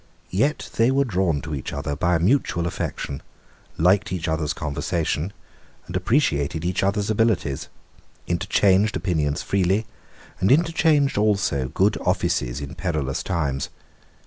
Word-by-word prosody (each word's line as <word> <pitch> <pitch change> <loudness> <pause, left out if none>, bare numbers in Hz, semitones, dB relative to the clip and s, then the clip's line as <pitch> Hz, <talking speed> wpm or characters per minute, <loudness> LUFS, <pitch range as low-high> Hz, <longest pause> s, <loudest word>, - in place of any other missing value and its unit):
Yet 140 - 0
they 115 +2 +4
were 140 +1 +2
drawn 90 - 0
to 80 +1 -6
each 70 - -4
other 70 0 -3
by 85 +4 +1
a - - +2
mutual 90 -3 +1
attraction, 70 -4 -4 0.6
liked 90 +4 +3
each 90 -3 -2
other's 80 -1 0
conversation, 75 +3 -2 0.6
appreciated 85 - +1
each 90 +1 0
other's 100 +2 +1
abilities, 105 -11 0 0.6
interchanged 95 +3 +2
opinions 75 -5 -1
freely, 100 +3 +1 0.5
and 95 +5 +3
interchanged 155 -4 +3
also 100 -11 +1
good 100 +9 +1
offices 85 -8 0
in 70 +2 -6
perilous 80 -5 -2
times. 70 -7 -2
90 Hz, 125 wpm, -23 LUFS, 75-105 Hz, 0.6 s, they